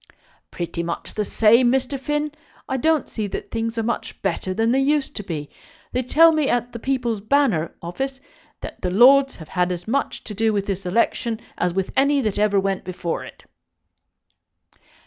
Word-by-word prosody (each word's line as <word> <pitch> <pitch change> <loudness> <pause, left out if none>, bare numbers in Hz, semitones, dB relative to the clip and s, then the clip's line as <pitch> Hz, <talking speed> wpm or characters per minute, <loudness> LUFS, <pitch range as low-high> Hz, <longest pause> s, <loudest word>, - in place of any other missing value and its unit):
"Pretty 170 -1 -4
much 170 0 -5
the 210 - -1
same, 230 +4 +4
Mr. 265 +1 0
Finn. 295 +2 -1 0.4
I 265 - -2
don't 315 +2 +2
see 215 -3 -4
that 190 - -6
things 230 0 -2
are 225 - 0
much 235 +2 -3
better 190 0 -1
than 225 +4 +1
they 265 - +3
used 285 +1 +1
to 205 - -4
be. 155 -6 -5 0.4
They 255 - 0
tell 325 +6 +6
me 310 -3 +1
at 245 0 0
the 235 - -6
People's 240 -4 -1
Banner 220 - +2
office 265 +10 -4 0.4
that - - -8
the 180 - -1
lords 265 +8 +6
have 160 -3 -12
had 180 0 0
as 175 +1 -5
much 275 +5 -1
to 210 - -7
do 220 +1 +1
with 200 -1 0
this 195 -1 -3
election 230 +3 0 0.2
as 180 - 0
with 190 -1 -1
any 280 +1 +3
that 210 -4 -1
ever 205 -1 +3
went 195 -1 -1
before 175 -2 -4
it." - - -13
225 Hz, 185 wpm, -22 LUFS, 190-265 Hz, 0.4 s, tell